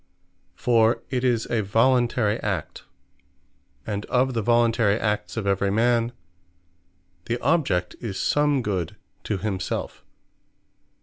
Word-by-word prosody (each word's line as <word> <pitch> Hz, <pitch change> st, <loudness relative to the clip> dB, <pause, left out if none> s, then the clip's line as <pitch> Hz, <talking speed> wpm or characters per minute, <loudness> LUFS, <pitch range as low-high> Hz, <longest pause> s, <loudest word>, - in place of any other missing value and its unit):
For 115 Hz, -1 st, +2 dB
it 125 Hz, -1 st, -1 dB
is 120 Hz, -3 st, +1 dB
a 115 Hz, -, +2 dB
voluntary 115 Hz, +1 st, +2 dB
act: 90 Hz, -9 st, -4 dB, 1.0 s
and 105 Hz, -1 st, -3 dB
of 130 Hz, +1 st, +1 dB
the 115 Hz, -, 0 dB
voluntary 115 Hz, -2 st, +2 dB
acts 105 Hz, 0 st, -2 dB
of 110 Hz, -, -2 dB
every 100 Hz, 0 st, +1 dB
man, 115 Hz, +2 st, +2 dB, 1.1 s
the 120 Hz, -, -1 dB
object 130 Hz, -, +1 dB
is 110 Hz, -6 st, -5 dB
some 145 Hz, -3 st, +2 dB
Good 95 Hz, -6 st, -2 dB, 0.3 s
To 105 Hz, -, -1 dB
Himselfe. 95 Hz, -2 st, -4 dB
115 Hz, 115 wpm, -24 LUFS, 100-120 Hz, 1.1 s, For